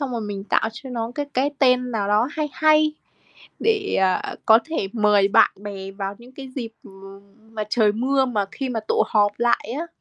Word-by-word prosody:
xong 275 -3 -3
rồi 235 - -2
mình 205 -2 -5
tạo 220 - +1
cho 255 +4 -10
nó 230 -1 -3
cái 290 -1 -3
cái 270 +3 +1
tên 250 -2 +3
nào 210 -4 -2
đó 215 +5 +2
hay 305 -1 -2
hay 310 0 +3 0.7
để, 420 -2 +1
à, 190 -1 0
có 220 0 +7
thể 320 -12 -3
mời 210 -3 +3
bạn - - +5
bè 195 -2 -7
vào 195 0 -5
những 240 +2 -15
cái 270 0 -9
dịp 230 -3 -4 0.8
mà 215 -1 -3
trời 215 -3 +3
mưa 265 +4 +1
mà 215 -5 -1
khi 270 - -4
mà 230 -3 -2
tụ - - +3
họp 205 -1 +2
lại 235 -1 +1
á. 335 - -4
235 Hz, 205 wpm, -22 LUFS, 210-270 Hz, 0.8 s, có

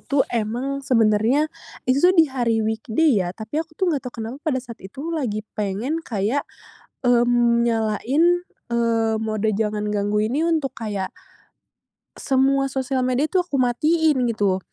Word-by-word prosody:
tuh 275 -1 +1
emang 240 +5 -2
sebenarnya 230 +2 +3 0.4
itu 255 +2 +2
tuh 360 +3 +5
di 325 - +7
hari 240 -6 0
weekday, 220 +3 +1
ya. 175 - -1
Tapi 225 +8 -3
aku 315 -1 -9
tuh 365 -3 +1
nggak 285 - -1
tahu - - -16
kenapa 250 +5 -7
pada 310 -5 -1
saat 235 -2 -10
itu 275 - -7
lagi 225 -10 -2
pengen 215 +10 -2
kayak, 230 0 -2 0.6
mmm, 240 -1 +3
nyalain, 230 +5 +1 0.5
eee, 230 -1 +1
mode 220 0 -1
jangan 210 0 -1
ganggu 205 0 0
ini 260 +8 -1
untuk 320 -5 0
kayak 205 -5 -4 1.1
semua 270 +1 +2
sosial 265 -1 -1
media 255 +4 +1
itu - - -2
aku 280 -7 -1
matiin, 300 +2 +2
gitu. 200 -4 +1
240 Hz, 150 wpm, -22 LUFS, 220-275 Hz, 1.1 s, di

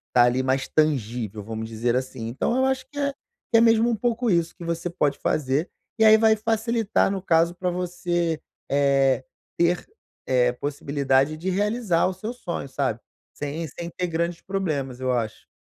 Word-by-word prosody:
ali, 120 +1 +5
mais 130 0 0
tangível 115 -8 0
vamos 110 +1 -5
dizer 115 +2 0
assim, 130 -3 -3
então 130 - -1
eu 260 - +3
acho 265 -1 0
que, 290 - -13
eh, 280 -1 0 0.4
é 230 - +7
mesmo 225 0 +5
um 235 - +1
pouco 235 +2 0
isso 170 -2 +1
que 170 - -9
você 170 +1 -2
pode 150 -5 0
fazer, 145 +3 0 0.3
e - - +5
aí 220 0 +8
vai 220 0 +5
facilitar 225 -1 +1
no 195 -1 -3
caso 170 -1 +3
pra 180 0 -1
você, 175 -2 -1 0.3
eh, 135 -2 +3 0.3
ter, 170 +1 +2 0.4
eh, 125 -1 +3
possibilidade 140 +1 0
de 175 +4 -3
realizar 205 -2 +1
o 185 - -2
seu 220 +5 -5
sonho, 175 - -5
sabe, 130 -4 -1 0.3
sem 150 +3 -4
sem 170 +4 -7
ter 180 - -1
grandes 170 0 -2
problemas, 150 -10 -2
eu 130 0 0
acho. 115 -3 -3
165 Hz, 175 wpm, -24 LUFS, 130-195 Hz, 0.4 s, aí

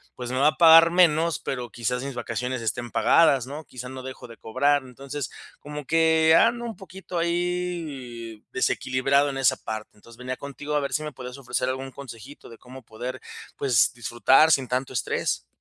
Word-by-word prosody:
pues 125 0 -6
me 130 - -2
va 145 - +5
a 155 - -4
pagar 165 0 +8
menos, 165 -3 +3
pero 125 -3 -4
quizás 125 +2 -2
mis 140 -1 -5
vacaciones 125 +1 -3
estén 115 +2 -3
pagadas, 140 -7 +4
¿no? 150 +3 -8
Quizás 125 +1 -9
no 130 0 -7
dejo 130 -1 -9
de 115 - -13
cobrar. 145 +5 +1
Entonces, 135 +1 -7 0.3
como 150 0 -7
que 160 0 +4
ando 235 +1 +2
un 225 - -6
poquito 190 -2 -8
ahí 165 -10 -3
desequilibrado 135 +2 +1
en 135 - -5
esa 130 0 +3
parte. 110 -1 -6
Entonces, 115 +2 -17
venía 125 0 -5
contigo 145 +2 -6
a 150 - +3
ver 140 - -4
si 155 - 0
me 150 - -5
puedes 125 +1 -9
ofrecer 125 -1 -2
algún 130 +1 -4
consejito 130 0 -11
de 115 - -13
cómo 130 +1 -12
poder, 120 +4 -7 0.4
pues 125 -6 +3
disfrutar 120 +7 +3
sin 135 -4 +2
tanto 130 +1 -2
estrés. 115 - -2
135 Hz, 185 wpm, -25 LUFS, 125-155 Hz, 0.4 s, pagar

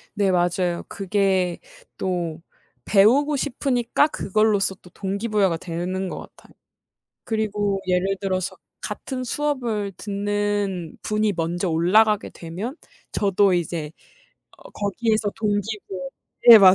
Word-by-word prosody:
네 200 -2 +2
맞아요. 175 0 +1
그게 190 -2 0 0.4
또 175 -3 -2 0.5
배우고 250 +9 +5
싶으니까 270 -1 +1
그걸로써 210 -6 +1
또 180 - -18
동기 200 +5 -3
부여가 200 -6 +2
되는 180 +2 -3
것 - - -5 0.2
같아요. - - -20 0.7
그리고 210 -3 0
예를 185 +2 +1
들어서 185 -2 -1 0.2
같은 255 -2 -4
수업을 240 -7 -1
듣는 205 -3 -2
분이 215 -1 +1
먼저 170 +3 -1
올라가게 200 +6 +3
되면 190 - -6 0.3
저도 200 -1 +3
이제 165 -3 -2 0.7
어 - - -14
거기에서 215 +1 0
동기 210 0 -1
부여 180 -1 -5 0.4
네 230 -2 +13
맞아요. 190 -2 +8
200 Hz, 260 characters per minute, -23 LUFS, 180-215 Hz, 0.7 s, 네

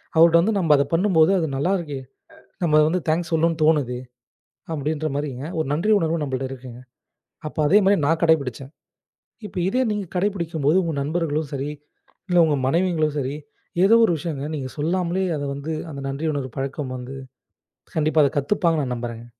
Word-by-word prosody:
அவர்கிட்ட 165 +1 +6
வந்து 205 +3 +1
நம்ம 160 -4 +4
அதை 140 0 +2
பண்ணும்போது, 170 -1 +4
அது 160 - 0
நல்லா 170 +8 0
இருக்கு. 150 -6 -5 0.7
நம்ம 155 -2 +4
வந்து 180 +3 +1
தேங்க்ஸ் 170 +2 0
சொல்லணும்னு 165 0 +1
தோணுது 145 -6 +2 0.8
அப்படிங்கிற 155 +1 -2
மாதிரி 145 0 -2 0.3
ஒரு 160 - 0
நன்றி 175 +9 +1
உணர்வு 165 -1 0
நம்மகிட்ட 135 -2 -2
இருக்குங்க. 125 -2 -9 0.7
அப்ப 155 - -10
அதே 190 +7 +6
மாதிரி 195 -3 +4
நான் 165 +2 +1
கடைபிடிச்சேன். 140 -4 +1 0.7
இப்ப 195 - -9
இதே 250 +7 +1
நீங்கக் 205 -4 -4
கடைபிடிக்கும்போது 170 -5 0
உங்க 165 -2 -2
நண்பர்களும் 155 0 -1
சரி, 140 +1 -3 0.6
இல்ல 180 - +2
உங்க 150 -2 +1
மனைவிங்களோ 165 0 +1
சரி, 135 +2 -3 0.5
ஏதோ 220 +4 +6
ஒரு 175 - +1
விஷயம் 150 -2 -4
நீங்க 130 -3 -4
சொல்லாமலே 180 +4 0
அதை 145 - -3
வந்து 140 +3 -5 0.2
அந்த 140 - -7
நன்றி 140 +4 -4
உணர் 130 -4 -4
பழக்கம் 135 -1 -3
வந்து 125 +2 -8 0.8
கண்டிப்பா 155 0 +3
அதைக் 140 +2 0
கத்துப்பாங்கன்னு 165 -1 +1
நான் 125 - -2
நம்புறேங்க. 115 -1 -6
155 Hz, 165 wpm, -23 LUFS, 140-170 Hz, 0.8 s, அவர்கிட்ட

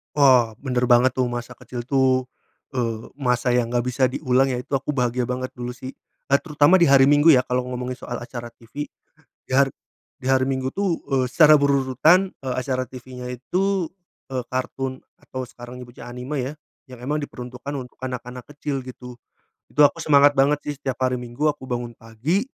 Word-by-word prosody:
Wah, 130 -6 +5
bener 125 -2 0
banget, 125 +1 +5
tuh. 130 -1 +2
Masa 120 0 -5
kecil 125 0 -7
tuh, 130 0 +2 0.5
eee, 115 -3 -2
masa 125 -2 +1
yang 120 -1 +2
nggak 120 -1 +2
bisa 125 +1 0
diulang, 130 0 +2
ya. 125 - -1
Itu 135 +2 -1
aku 140 +2 -4
bahagia 125 -1 0
banget, 130 0 -3
dulu 125 0 -5
sih. 130 +1 -7 0.4
Eee, 140 - +6
terutama 155 +2 +4
di 170 - +5
hari 135 -1 +7
Minggu 145 +2 +6
ya, 130 -2 +4
kalau 125 0 -1
ngomongin 125 0 -4
soal 120 - -5
acara 120 -1 -7
tivi. 140 +6 -7 0.6
Di - - -10
har 135 +1 +5 0.5
di 130 - -11
hari 130 0 +3
Minggu 130 0 -1
tuh, 195 -4 -1
eee, 130 -1 +2
secara 155 +3 +7
berurutan, 140 +7 +3
eee, 130 -2 -5
acara 130 -1 -2
tivinya 125 0 -9
itu, 180 +9 -1 0.4
eee, 130 -2 -2
kartun 130 0 -3 0.2
atau 130 0 -6
sekarang 120 0 -11
dibaca 120 0 -11
anime 125 +4 -5
ya, 130 +3 -3 0.4
yang 125 -2 -11
emang 150 +3 0
diperuntukkan 125 0 -7
untuk 125 -2 -8
anak-anak 125 -1 -6
kecil, 145 -2 -3
gitu. 125 -1 -10 0.5
Itu 150 - +2
aku 165 +4 -8
semangat 145 -1 +5
banget 140 +2 +3
sih, 145 - -2
setiap 130 -2 -4
hari 125 - -1
Minggu, 125 +4 -2
aku 150 -3 -1
bangun 120 -1 -3
pagi, 120 - -1
130 Hz, 185 wpm, -23 LUFS, 125-140 Hz, 0.6 s, hari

